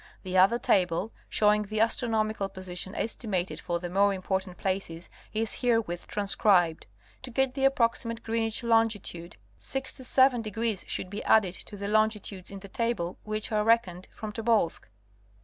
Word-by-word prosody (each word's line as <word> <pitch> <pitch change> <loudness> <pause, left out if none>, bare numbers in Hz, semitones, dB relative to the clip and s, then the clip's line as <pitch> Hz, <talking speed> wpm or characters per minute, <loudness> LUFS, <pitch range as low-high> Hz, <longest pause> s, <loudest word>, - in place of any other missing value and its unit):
The 185 0 -4
other 190 +6 +6
table, 185 -1 +1 0.2
showing 210 0 +3
the 215 +1 -3
astronomical 220 -3 +1
position 185 0 -6
estimated 190 -8 -2
for 170 0 -2
the 175 +1 -5
more 200 +3 +3
important 190 -1 -3
places 185 -3 -3 0.2
is 220 0 -1
herewith 225 -8 0
transcribed. 195 -5 +2 0.3
To 260 - -8
get 265 +1 +1
the 270 0 0
approximate 230 -3 +1
Greenwich 225 0 -1
longitude 225 -7 0 0.2
67° 245 -5 0
should 185 - -2
be 205 - -5
added 200 -5 +4
to 205 - -8
the 200 0 -4
longitudes 210 -3 0
in 195 -1 -8
the 200 - -9
table 195 -5 -2
which 215 +1 -3
are 210 -1 +2
reckoned 210 -6 +2
from 215 -1 -6
Tobolsk. 220 - 0
210 Hz, 145 wpm, -28 LUFS, 185-230 Hz, 0.3 s, other